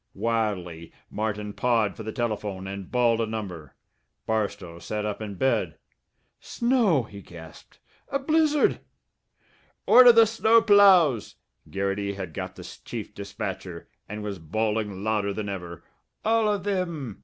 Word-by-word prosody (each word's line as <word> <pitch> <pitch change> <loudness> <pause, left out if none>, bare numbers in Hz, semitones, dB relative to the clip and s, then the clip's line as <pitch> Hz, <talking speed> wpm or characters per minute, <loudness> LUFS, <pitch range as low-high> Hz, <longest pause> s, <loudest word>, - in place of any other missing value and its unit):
Wildly 100 -8 -2 0.2
Martin 105 -1 -3
pawed 115 -4 +1
for - - -9
the 110 0 -5
telephone 105 -5 -3
and 95 -1 -7
bawled 120 -2 +2
a 115 - -1
number. 95 -9 -6 0.5
Barstow 100 -6 -3
sat 105 +3 -4
up 105 0 -4
in 105 -2 -6
bed. 130 +7 0 0.6
"Snow!" 235 - +1
he 100 -2 -11
gasped. 85 -3 -14 0.3
"A 275 - 0
blizzard!" 300 +1 +2 1.1
"Order 245 -1 +9
the 230 -1 +6
snow 225 +1 +4
ploughs!" 195 - +5 0.3
Garrity 100 +1 -2
had 95 -5 -7
got - - -6
the - - -10 0.2
chief - - -7
dispatcher, 95 -3 -7 0.2
and 105 +1 -6
was 100 -3 -5
bawling 105 +3 -2
louder 105 -2 0
than 105 0 -4
ever. 90 -3 -7 0.4
"All 220 -1 +3
of 205 -3 -2
thim! 170 - -3
110 Hz, 135 wpm, -25 LUFS, -, 1.1 s, Order